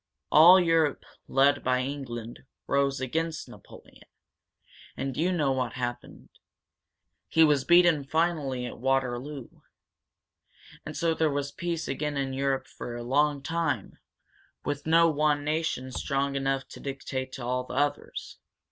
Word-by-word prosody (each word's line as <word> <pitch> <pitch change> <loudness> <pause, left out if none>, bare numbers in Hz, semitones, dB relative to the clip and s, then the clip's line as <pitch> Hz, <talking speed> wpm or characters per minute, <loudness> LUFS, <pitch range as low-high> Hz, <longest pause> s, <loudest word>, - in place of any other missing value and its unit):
All 175 +5 +9
Europe, 165 -4 +2 0.2
led 140 +1 +3
by 125 0 +1
England, 125 -4 -6 0.3
rose 140 0 +1
against 160 +5 -2
Napoleon. - - -15 0.9
And 135 -1 -3
you 175 +4 +1
know 150 -6 +1
what 130 -1 -1
happened. 120 -1 -6 1.0
He 160 - +4
was 145 -4 +3
beaten 175 -4 +5
finally 150 -5 0
at 120 - -8
Waterloo. 135 +1 -1 1.4
And - - -6
so 165 -1 +1
there 160 -1 +1
was 140 0 -2
peace 170 -2 -3
again 145 +1 -2
in 135 -1 -2
Europe 135 0 -1
for 120 - -8
a 120 - -6
long 140 +3 +1
time, 160 - -2 0.7
with 145 +1 -3
no 165 +1 +5
one 150 -2 +1
nation 150 -4 -2
strong 140 +1 -1
enough 135 0 -1
to - - -11
dictate 135 -1 -5
to 125 - -6
all 125 +1 -1
the 125 - -8
others." 145 +1 -2
140 Hz, 140 wpm, -27 LUFS, 130-155 Hz, 1.4 s, All